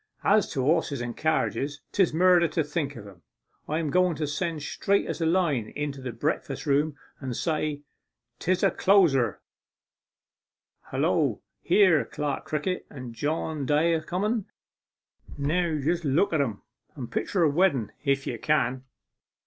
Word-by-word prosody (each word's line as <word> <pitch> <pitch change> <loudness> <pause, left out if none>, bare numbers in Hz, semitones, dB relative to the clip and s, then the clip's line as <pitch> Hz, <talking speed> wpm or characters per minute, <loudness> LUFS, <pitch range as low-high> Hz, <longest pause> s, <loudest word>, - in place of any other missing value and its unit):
As 210 -1 +3
to 130 - -1
horses 150 -1 +1
and 120 -1 -4
carriage, 150 -2 0
'tis 190 -4 +3
murder 175 +1 +5
to 160 +1 0
think 150 -1 -3
of 110 -4 -9
'em. 95 -4 -15 0.5
I 155 - 0
am 160 -3 -1
going 180 0 +3
to 155 - -2
send 155 +1 -3
straight 200 +6 0
as - - -4
a 165 - +2
line 155 -11 +1
into 145 -2 -4
the 130 -1 -4
breakfast 145 +9 -3
room, 145 +1 +1 0.2
and 130 -3 -4
say 155 -3 -1 0.6
'tis 185 +1 0
a - - +4
closer.... 170 -11 +3 1.5
Hullo - - +1 0.2
here's 185 -8 +4
Clerk 145 0 -3
Crickett 155 +4 -2
and 125 -4 -8
John 145 +3 -2
Day 155 +3 +3
a 160 - 0
comen! 205 +6 -1 0.9
Now 160 +3 0
just 165 +4 0
look 155 +6 +2
at 155 - +3
'em 110 -7 -3 0.3
and 130 -5 -7
picture 185 -4 0
a - - +5
wedden 140 - +2
if 140 -2 +1
you 120 - -4
can. 130 -3 +1
155 Hz, 155 wpm, -27 LUFS, 140-170 Hz, 1.5 s, murder